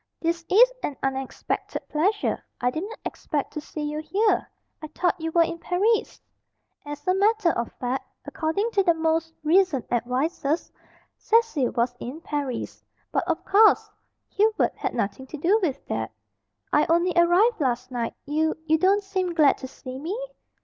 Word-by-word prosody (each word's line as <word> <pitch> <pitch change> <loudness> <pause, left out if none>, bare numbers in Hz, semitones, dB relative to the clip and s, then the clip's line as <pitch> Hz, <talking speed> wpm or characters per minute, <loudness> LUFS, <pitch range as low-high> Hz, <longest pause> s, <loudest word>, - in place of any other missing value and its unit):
"This 335 0 -1
is - - +6
an 285 - -3
unexpected 270 0 -3
pleasure. 395 +7 0 0.2
I 245 0 +1
didn't 395 - -5
expect 290 -2 -3
to 300 - -4
see 300 0 -6
you 300 +1 -3
here. 410 +7 +1 0.3
I 310 - -6
thought 355 +3 -1
you 325 - -1
were 335 +1 +4
in 335 0 -4
Paris." 410 +7 +1 0.6
As 290 0 -8
a 365 - +4
matter 405 -2 +3
of 235 -5 -3
fact 255 +1 -3 0.2
according 370 +9 -1
to 400 - +3
the 345 -3 +3
most 325 0 0
recent 325 -4 +3
advices, 275 +6 -1 0.5
Cecil 450 - +2
was 240 +1 +1
in 260 +6 -6
Paris. 285 -6 -4 0.3
But, 340 - 0
of 335 0 -1
course, 425 +2 +5 0.4
Hubert 435 +1 +2
had - - -3
nothing 230 +3 -2
to 305 - -7
do 365 +9 +3
with 290 -7 -2
that. - - -3 0.6
"I 295 - +4
only 345 +2 +3
arrived 350 +5 +4
last 250 -2 -1
night. 235 -2 -3
You 315 +2 0
you 315 0 +3
don't 395 +3 +3
seem 375 -3 -2
glad 300 -4 +4
to 260 - -6
see 255 0 -9
me?" 360 - -4
325 Hz, 165 wpm, -25 LUFS, 280-380 Hz, 0.6 s, is